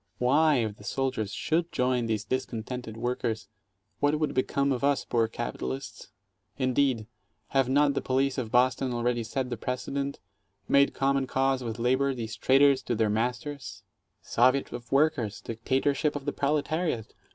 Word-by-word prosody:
Why, 145 +6 +4
if 110 -5 -1
the - - -14
soldiers 110 -4 -2
should 165 +8 -1
join 125 -2 +1
these 110 -2 -1
discon 120 -3 -2
tented 125 -3 -6
workers, 120 -1 -2 0.5
what 145 +1 +2
would 155 - 0
become 140 +2 +1
of 130 0 -1
us 140 0 +2
poor 115 -2 +1
capitalists? 65 - -5 0.5
Indeed, 130 -3 +1 0.4
have 135 -2 +2
not 140 +1 +4
the - - -1
police 135 +1 0
of 115 -4 -3
Boston 125 +1 +2
already 120 0 0
set 125 +2 -3
the 120 - -2
precedent 140 +3 -3 0.3
— 100 0 -48
made 140 0 +4
common 135 -1 +1
cause 135 0 +1
with 115 -1 -4
labor, 130 +3 +1
these 115 -2 -5
traitors 135 +3 +4
to 120 - -2
their 110 -1 +1
masters! 125 +6 -3 0.4
"Soviet 130 +3 +2
of 120 0 -8
Workers," 135 -7 +2
dictatorship 135 +6 0
of 140 -1 -5
the 145 - -1
Proletariat"! 150 -3 -1
130 Hz, 160 wpm, -28 LUFS, 115-140 Hz, 0.5 s, Why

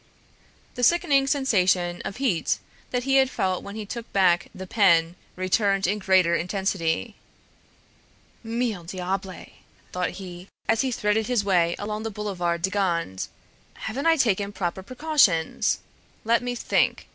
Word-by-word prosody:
The 245 - -6
sickening 275 -1 +3
sensation 185 -11 +2
of - - -4
heat 225 - +1 0.3
that 250 -1 -1
he 270 +1 +3
had 265 -1 +4
felt 185 -7 -1
when 200 - -8
he 215 -1 -5
took 235 +3 -7
back 180 -3 +3
the 190 - -8
pen 175 -5 +3 0.2
returned 195 +1 +1
in 205 +4 0
greater 190 -3 +3
intensity. 190 +2 -1 1.3
"Mille 225 -5 -2
diables!" 185 +2 -4 0.4
thought 180 0 -1
he, 180 -1 -9 0.2
as 225 0 +3
he 265 -1 -1
threaded 215 -1 0
his 245 -5 +1
way 175 -3 +2
along 210 +1 -4
the 225 - -3
Boulevard 180 -5 -2
de 190 - +1
Gand, 170 - -1 0.5
"haven't 265 +8 -3
I 330 - +6
taken 205 -8 +1
proper 185 -2 -3
precautions? 255 - +2 0.5
Let 235 +2 +3
me 245 0 -3
think! - - 0
200 Hz, 145 wpm, -25 LUFS, 180-235 Hz, 1.3 s, I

